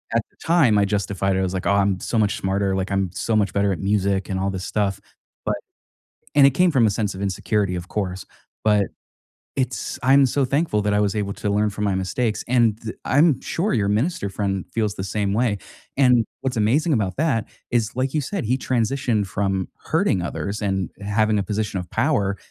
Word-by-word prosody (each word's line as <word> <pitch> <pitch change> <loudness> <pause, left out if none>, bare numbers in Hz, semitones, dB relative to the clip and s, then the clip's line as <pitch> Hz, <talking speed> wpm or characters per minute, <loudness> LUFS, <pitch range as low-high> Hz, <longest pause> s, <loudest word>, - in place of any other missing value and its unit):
At 115 - +4
the - - -34
time, 155 -11 +4
I 100 - +4
justified 100 -1 0
it, - - +1
I 95 - +1
was 90 - -2
like, 95 - -3
"Oh, - - +3
I'm 100 -2 +2
so 115 - -2
much 105 -2 +1
smarter, 95 0 0
like, 95 +1 -2
I'm 95 -2 0
so 115 - -1
much 100 -3 +2
better 100 0 +2
at - - -5
music, 100 -1 0
and 95 - -1
all 95 +1 0
this 95 -1 -5
stuff," 100 -3 -1 0.5
but- - - +1 0.8
and 140 -1 +7
it - - +6
came 180 +6 +3
from 130 -5 +4
a - - +3
sense 100 -1 -2
of 95 - -6
insecurity, 100 0 0
of 90 +1 -6
course- 95 -3 -3 0.4
but 105 -2 +4 0.7
it's 130 -1 -2
I'm 135 +2 +6
so 135 +2 +1
thankful 140 -4 +1
that 105 0 +1
I 105 - +3
was 100 -2 +1
able 100 -1 -1
to 105 - -2
learn 105 +1 +2
from 105 +1 -4
my 100 -2 +1
mistakes, 105 +4 -1
and 120 -4 +3
the 110 -1 -6
I'm 145 0 +4
sure 195 +6 -1
your 100 -3 +1
minister 110 - 0
friend 95 -2 -2
feels 105 -3 0
the 95 - -5
same 100 +1 -1
way. 115 -2 +1 0.4
And, 125 -4 +5 0.2
what's 130 -2 -2
amazing 140 +10 +2
about 100 -5 -1
that 135 -8 +1 0.2
is, 115 -2 0
like 130 +2 -1
you 155 - +2
said, 195 +5 -3
he 125 +4 +1
transitioned 120 -3 0
from 95 0 -1 0.2
hurting 95 - +1
others, 100 +4 -4
and 95 -3 -1
having 105 +1 +1
a 100 - +1
position 105 -1 -2
of 90 - -9
power, 100 -10 +1
105 Hz, 215 wpm, -22 LUFS, 100-120 Hz, 0.8 s, and